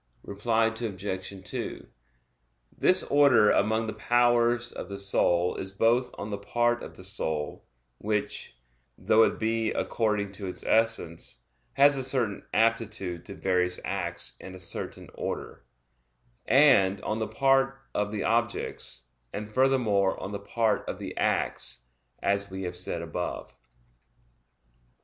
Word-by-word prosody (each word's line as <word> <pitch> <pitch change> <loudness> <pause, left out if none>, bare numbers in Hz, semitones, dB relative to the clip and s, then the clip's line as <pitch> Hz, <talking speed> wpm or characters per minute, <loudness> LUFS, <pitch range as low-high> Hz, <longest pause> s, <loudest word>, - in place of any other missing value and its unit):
Reply 110 +3 +1
Obj. 100 -4 -4
2: - - -5 0.9
This 185 0 +4
order 140 -7 +5
among 110 +1 +2
the 110 - -4
powers 120 +2 +2
of 90 - -7
the 100 - -5
soul 90 -3 +2
is 95 - -4
both 120 +5 +2
on 105 - -5
the 100 - -3
part 120 +3 +1
of - - -9
the - - -12
soul 80 -6 -2 0.4
(which, 105 - -3 0.4
though 110 - +4
it - - +3
be 115 0 0
one - - -2
according 105 -3 0
to 100 0 -6
its 90 - -5
essence, 85 - 0 0.3
has 140 0 +5
a 135 - -1
certain 125 -6 0
aptitude 110 -6 0
to 100 - -8
various 90 -1 +1
acts - - -1
in 95 0 -9
a - - -8
certain 95 -1 -5
order) - - -5 0.8
and 130 -9 +5
on 110 +1 -2
the 110 - -1
part 135 0 +2
of 105 0 -1
the 105 -2 -2
objects, 115 0 -1 0.3
and 105 +1 -6
furthermore 120 -7 +2
on 95 - -5
the 100 - -4
part 110 +2 0
of - - -4
the - - -7
acts, - - -1 0.4
as 100 0 +1
we 95 0 -6
have 90 -1 -4
said 85 -1 -4
above. 90 +1 -5
105 Hz, 140 wpm, -28 LUFS, 95-120 Hz, 0.9 s, order